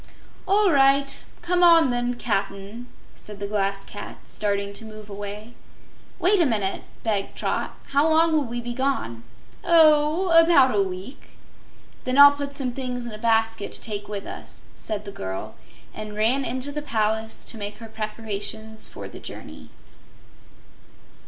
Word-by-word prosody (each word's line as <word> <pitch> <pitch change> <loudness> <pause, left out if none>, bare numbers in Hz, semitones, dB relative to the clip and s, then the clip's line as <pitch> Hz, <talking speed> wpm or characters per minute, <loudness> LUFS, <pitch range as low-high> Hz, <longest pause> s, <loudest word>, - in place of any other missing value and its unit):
"All 400 0 +4
right. 275 -1 +4 0.2
Come 355 +1 +1
on, 335 -6 +6
then, 245 0 -1
Cap'n," 205 0 -3 0.3
said 210 -1 -12
the 200 - -3
Glass 195 -1 -1
Cat, 205 - -8
starting 200 -1 -2
to 200 - -5
move 215 -1 -11
away. 205 +3 -7 0.6
"Wait 375 +1 +4
a - - +4
minute," 205 -5 -1 0.2
begged 205 -3 -1
Trot. - - -2
"How 285 +3 +3
long 325 +1 +4
will 300 -3 +2
we 240 0 -4
be 240 0 -5
gone?" 260 - -2 0.4
"Oh, 320 +1 +4
about 330 -6 +6
a 200 - +3
week." 190 +6 -7 0.7
"Then 255 +1 -1
I'll 285 0 +10
put 285 0 -5
some 265 -3 -2
things 250 -2 -3
in 235 - -6
a 215 - -8
basket 225 -2 +1
to - - 0
take 205 -2 -2
with 205 -1 -5
us," - - -10
said 210 -1 -5
the 200 - -6
girl, 95 - -6 0.4
and 215 -1 -7
ran 230 +6 +2
into 260 +3 +1
the 295 +1 -4
palace 220 -4 -1
to 225 - -4
make 205 0 -5
her 225 - -10
preparations 220 0 -4
for - - -8
the - - -11
journey. - - -10
230 Hz, 160 wpm, -24 LUFS, 210-280 Hz, 0.7 s, I'll